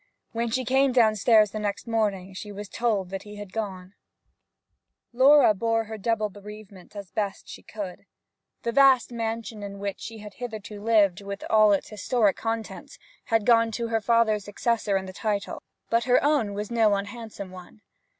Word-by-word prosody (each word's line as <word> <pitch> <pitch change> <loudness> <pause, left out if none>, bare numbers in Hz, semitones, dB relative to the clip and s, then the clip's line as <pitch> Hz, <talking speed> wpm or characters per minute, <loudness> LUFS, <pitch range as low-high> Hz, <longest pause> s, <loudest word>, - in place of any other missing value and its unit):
When 230 +1 -2
she 255 +3 -1
came 265 +1 +3
downstairs 215 -2 +4
the 215 - -4
next 205 -1 -3
morning 205 -5 -1
she 205 +2 -8
was 205 +1 -7
told 205 -5 -1
that 195 -1 -4
he 210 0 -11
had 205 -2 -9
gone. 195 -4 -5 1.2
Laura 270 -1 +6
bore 225 +2 0
her 220 0 -7
double 215 0 0
bereavement 205 -1 -13
as 200 -2 -8
best 200 -2 -3
she - - -10
could. 200 -4 -8 0.6
The 235 - -1
vast 265 -2 +5
mansion 225 -1 -4
in 200 -1 -7
which 200 0 -4
she 225 0 -8
had 210 -1 -10
hitherto 220 -4 -7
lived, 205 -4 +3
with 200 0 -7
all 215 -1 +6
its 200 - 0
historic 215 0 +1
contents, 225 0 -5 0.3
had 225 -3 +1
gone 230 -1 +5
to 230 +1 -3
her 225 -1 0
father's 220 -2 +2
successor 210 -1 0
in 190 - -4
the 185 - -9
title; 205 0 -3 0.3
but 230 0 +2
her 250 -1 +3
own 280 -9 +1
was 210 +2 -5
no 220 -3 +3
unhandsome 205 -1 -6
one. 185 +3 -13
215 Hz, 175 wpm, -26 LUFS, 200-230 Hz, 1.2 s, Laura